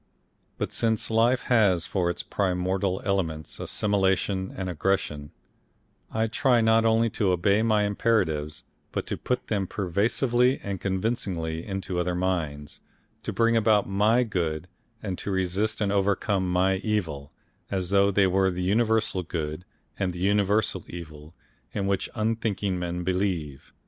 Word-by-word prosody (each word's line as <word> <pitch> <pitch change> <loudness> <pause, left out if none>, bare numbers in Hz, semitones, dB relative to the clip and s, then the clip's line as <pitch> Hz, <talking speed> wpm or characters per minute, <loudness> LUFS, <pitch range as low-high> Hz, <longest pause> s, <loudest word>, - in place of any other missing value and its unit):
But - - -3
since 110 -1 0
life 115 +3 +3
has 100 -8 +3
for 90 -3 0
its 85 - -3
primordial 95 0 -1
elements 80 -6 -2
assimilation 95 -1 0
and 95 -1 -3
aggression, 80 -4 -1 0.8
I 110 0 +1
try 125 +2 +2
not 110 0 +4
only 115 +1 +4
to 100 -4 +1
obey 100 +4 +2
my 110 -2 +3
imperatives, 90 -8 0 0.3
but - - -3
to - - -3
put 125 - -2
them 100 -3 -1
persuasively 120 +8 +1
and 100 -2 -4
convincingly 95 -5 -2
into 95 -2 -3
other 90 0 0
minds, 80 -6 -2 0.4
to - - -4
bring 115 0 +2
about 110 -2 +3
my 105 +5 +3
good 85 -7 -2 0.4
and 95 -4 -3
to - - -4
resist 95 +3 0
and 100 -1 +1
overcome 100 -1 +1
my 95 +2 +2
evil 85 -9 -2 0.4
as 95 -2 -2
though 100 0 +5
they 100 0 +3
were 95 +1 +3
the 90 0 -3
universal 110 0 +1
Good 80 -1 -4 0.3
and 95 -2 0
the 90 - -7
universal 100 +1 +1
Evil 80 -2 -10 0.4
in 100 - -1
which 100 -1 0
unthinking 110 -4 -1
men 90 0 -3
believe. 90 -6 -2
95 Hz, 145 wpm, -26 LUFS, 90-110 Hz, 0.8 s, though